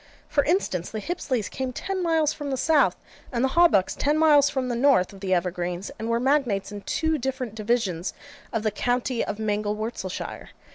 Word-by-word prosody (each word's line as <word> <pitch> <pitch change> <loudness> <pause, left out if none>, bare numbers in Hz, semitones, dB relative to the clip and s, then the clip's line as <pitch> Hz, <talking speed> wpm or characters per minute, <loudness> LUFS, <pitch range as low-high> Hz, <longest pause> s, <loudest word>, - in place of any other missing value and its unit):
For 285 - +2
instance, 275 - 0
the 220 - -4
Hipsleys 255 - -2
came 260 -1 -4
ten 385 +8 -3
miles 320 -3 +2
from 290 -1 -5
the 265 - -1
south, 310 +2 +3 0.4
and 240 -1 0
the 265 - +3
Hawbucks 325 - +4
ten 295 +2 +1
miles 295 -3 +5
from 265 -3 -2
the 245 - -1
north, 235 -8 +3
of 195 - -12
the 190 -1 -4
Evergreens; 180 +1 -1
and 225 - -3
were 230 0 +2
magnates 250 -7 +1
in 205 -1 -6
two 320 +6 0
different 260 -3 -3
divisions 210 -6 -1 0.4
of 225 -2 -2
the 215 - +1
county 245 +2 0
of - - -4
Mangelwurzelshire. 210 -1 -3
245 Hz, 185 wpm, -25 LUFS, 205-285 Hz, 0.4 s, miles